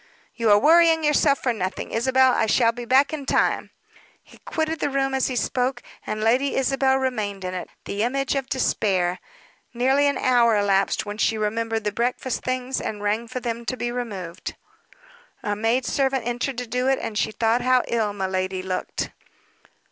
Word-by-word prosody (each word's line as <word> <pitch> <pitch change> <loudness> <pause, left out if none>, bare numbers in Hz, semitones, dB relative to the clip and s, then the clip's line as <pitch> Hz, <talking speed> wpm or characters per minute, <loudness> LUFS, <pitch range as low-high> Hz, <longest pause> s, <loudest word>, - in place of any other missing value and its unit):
"You 230 -2 0
are 205 - +7
worrying 325 +5 +5
yourself 290 -2 +3
for 250 - +1
nothing, 185 -4 -4
Isabel. 260 +3 +3
I 225 - +1
shall 230 +2 +3
be 240 +1 -7
back 265 +5 +3
in 285 -3 -5
time." - - +1 0.5
He - - -19
quitted 320 0 -2
the 290 - 0
room 270 -1 0
as 265 -1 +1
he 255 - -3
spoke, 250 +1 -1 0.2
and 215 - -3
Lady 255 +5 +2
Isabel 270 0 +2
remained 215 -7 -2
in 185 - -3
it, 180 - -5 0.2
the 200 - -3
image 265 +3 0
of 270 -2 -2
despair. 190 -8 0 0.6
Nearly 265 +4 +3
an 280 - +1
hour 235 -3 +3
elapsed 200 0 +1
when 205 +1 -6
she 225 - +2
remembered 225 +1 -1
the 210 - -1
breakfast 245 +3 -2
things, 255 0 -2
and 205 -1 -5
rang 215 +3 0
for 255 - -5
them 235 -1 -3
to 255 - -3
be 240 0 -2
removed. 200 -8 -5 0.9
A 205 -1 -1
maid 225 +4 0
servant 265 -3 0
entered 245 +2 -2
to 250 - -3
do 250 +2 -1
it, 270 0 +3
and 220 - -5
she 220 - 0
thought 225 +2 +1
how 255 -1 +3
ill 225 -3 0
miladi 190 -1 -2
looked. 185 -1 -3
240 Hz, 185 wpm, -23 LUFS, 210-265 Hz, 0.9 s, are